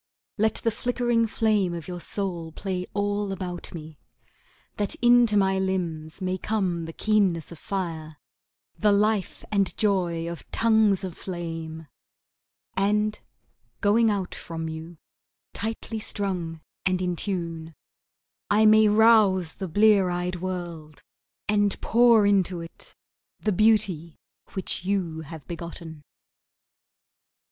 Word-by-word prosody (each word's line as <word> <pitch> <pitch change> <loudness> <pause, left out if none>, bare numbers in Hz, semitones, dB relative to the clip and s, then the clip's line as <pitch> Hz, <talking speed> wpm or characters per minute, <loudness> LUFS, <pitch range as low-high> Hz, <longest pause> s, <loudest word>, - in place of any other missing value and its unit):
Let 220 0 +2
the 230 - +2
flickering 240 0 +1
flame 210 -5 +1
of 165 -2 -7
your 175 -1 -6
soul 175 -5 -4
play 185 +1 -4
all 205 0 0
about 180 -2 -5
me, 155 -3 -9 0.8
That 205 -1 -1
into 240 -3 +5
my 190 -1 +3
limbs 175 -3 -2
may 185 0 -1
come 185 -6 -1
the 165 - -6
keenness 190 -5 +1
of 165 - -10
fire, 160 -6 -4 0.6
The 210 -1 +4
life 205 -1 +1
and 200 -2 +1
joy 175 -5 +1
of 170 -2 -7
tongues 220 -4 +3
of 185 -3 -5
flame, 165 -3 -6 0.9
And, 210 +2 +1 0.6
going 225 +3 +4
out 200 -3 -2
from 165 -1 -5
you, 160 +1 -7 0.6
tightly 225 0 -4
strung 180 -7 -4 0.2
and 185 -1 +1
in 180 -1 -1
tune, 165 -4 -4 0.7
I 215 +1 +4
may 215 0 +7
rouse 210 -5 +5
the 190 - -5
blear 205 +1 +4
eyed 180 +1 -2
world, 175 -4 -6 0.4
And 205 -1 +2
pour 235 -2 +5
into 190 -3 +2
it 165 0 -9 0.4
the 215 - 0
beauty 195 -6 +2 0.3
which 190 -2 -3
you 180 -5 -1
have 150 -2 -10
begotten. 170 -2 -7
190 Hz, 120 wpm, -26 LUFS, 170-210 Hz, 0.9 s, may